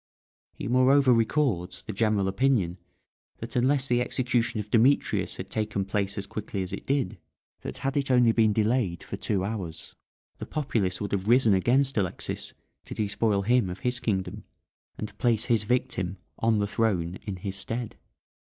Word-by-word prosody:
He - - -5
moreover 130 +1 +5
records 115 - 0
the 110 - -6
general 105 -2 +1
opinion 95 -4 +1 0.6
that 115 +1 -8
unless 130 +2 +2
the 120 -1 +2
execution 120 -3 0
of 105 0 -6
Demetrius 125 +5 +2
had - - -7
taken 105 -2 -1
place 100 +1 -2
as 100 - -3
quickly 100 -2 -4
as 90 - -7
it - - -7
did 135 -8 0 0.4
that - - -6
had 135 +1 -2
it 140 -1 0
only 125 -2 +5
been 110 -1 +3
delayed 105 -4 0
for - - -6
two 95 -3 -1
hours 95 -7 -5 0.5
the - - -6
populace 110 -11 -1
would 100 - -3
have 100 0 -1
risen 120 -2 +5
against 130 +7 +2
Alexis 95 -4 -3 0.3
to - - -7
despoil 105 -1 0
him 120 -2 +2
of 90 - -7
his 125 0 0
kingdom, 95 -6 -2 0.5
and 105 - -6
place 115 -4 +2
his 115 -4 +2
victim 95 -6 -1 0.2
on 115 -1 +2
the 105 - +1
throne 95 -5 0
in 100 - -3
his 95 +1 -5
stead. 115 +4 -4
110 Hz, 170 wpm, -27 LUFS, 100-125 Hz, 0.6 s, moreover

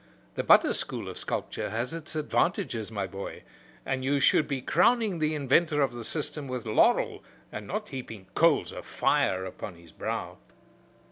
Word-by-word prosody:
The - - -1
butter - - +6
school - - -2
of - - -6
sculpture - - -3
has 115 +7 -2
its 165 -1 -6
advantages, 145 - 0
my 100 -3 -2
boy, 95 +1 -7 0.4
and 130 -1 -1
you 140 +2 +2
should 150 - +4
be 140 -2 -2
crowning 210 - +2
the 155 0 +1
inventor 150 +2 +3
of 130 -3 0
the 120 -1 -6
system 150 +2 -3
with 125 -2 -4
laurel, 110 - +3 0.3
and 105 -1 -7
not 210 +2 -3
heaping 115 -7 -7
coals 165 -3 +3
of - - -7
fire 95 0 +1
upon 95 0 -7
his 85 -1 -16
brow." - - -4
135 Hz, 165 wpm, -28 LUFS, 110-155 Hz, 0.4 s, butter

